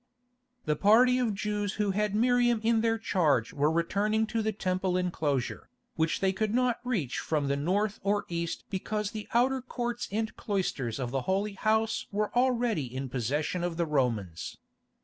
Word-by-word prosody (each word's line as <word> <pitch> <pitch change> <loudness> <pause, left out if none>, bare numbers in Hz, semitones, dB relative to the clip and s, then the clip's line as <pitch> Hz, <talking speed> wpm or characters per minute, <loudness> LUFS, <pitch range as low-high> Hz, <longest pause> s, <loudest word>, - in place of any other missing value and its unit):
The 150 - +1
party 240 +8 +5
of 230 -5 0
Jews 205 0 -2
who 210 -2 0
had 210 +1 0
Miriam 240 0 +3
in 225 0 +3
their 225 0 +2
charge 150 - +1
were 145 +1 +2
returning 200 +7 +1
to 225 - +1
the 220 0 0
Temple 185 -2 -1
enclosure, 150 -8 -1 0.3
which 160 0 0
they 190 -1 +2
could 215 +3 -1
not 250 -2 +2
reach 200 - -1
from 150 -3 -1
the 140 - +1
north 195 +8 0
or 205 +1 0
east 170 -1 -3
because 210 +2 -2
the 215 -2 -6
outer 260 +2 +3
courts 240 -1 -3
and 220 +2 -2
cloisters 165 - -2
of 125 -2 -3
the 135 0 0
Holy 200 +2 0
House 220 +2 0
were 210 +2 -1
already 245 - +2
in 130 +1 -4
possession 145 +8 -1
of 175 -2 -2
the 170 - +1
Romans. 115 - -1
200 Hz, 170 wpm, -29 LUFS, 155-220 Hz, 0.3 s, party